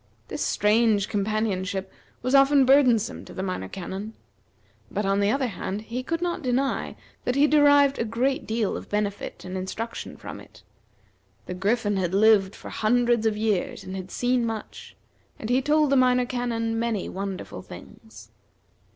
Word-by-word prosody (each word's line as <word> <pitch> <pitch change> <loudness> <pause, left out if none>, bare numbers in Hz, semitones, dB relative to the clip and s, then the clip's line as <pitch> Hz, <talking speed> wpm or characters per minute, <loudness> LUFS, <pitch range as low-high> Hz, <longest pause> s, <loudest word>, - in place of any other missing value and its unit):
This - - -5
strange 210 -1 +2
companionship 200 -2 -1 0.3
was 255 +2 -1
often 275 0 +6
burdensome 250 -5 +3
to - - -12
the 190 - -3
Minor 185 - -3
Canon; 195 - -6 0.7
but, 205 +1 -2
on 195 +1 +2
the 200 0 +2
other 270 +3 +1
hand, 200 -2 -4
he 235 +3 -4
could 330 +6 -3
not 345 -1 -2
deny 265 0 -1 0.3
that 250 - -1
he 280 +1 +5
derived 285 -2 +5
a - - +2
great 245 +5 -1
deal 220 -2 0
of - - -8
benefit 205 -2 -3
and 185 +1 -6
instruction 200 +5 -5
from - - -8
it. - - -16 0.8
The - - -5
Griffin 205 +2 0
had 185 -1 -1
lived 205 -2 +4
for - - -10
hundreds 235 0 +2
of 215 -1 0
years, 210 -4 -1
and 185 - -7
had 190 0 -6
seen 245 +2 0
much; 225 -2 -6 0.4
and 220 - -4
he 255 +2 +3
told 295 +1 +2
the - - +4
Minor 250 -1 +4
Canon 230 -2 -2
many 230 -4 -1
wonderful 195 0 -5
things. - - -13
225 Hz, 165 wpm, -25 LUFS, 200-255 Hz, 0.8 s, often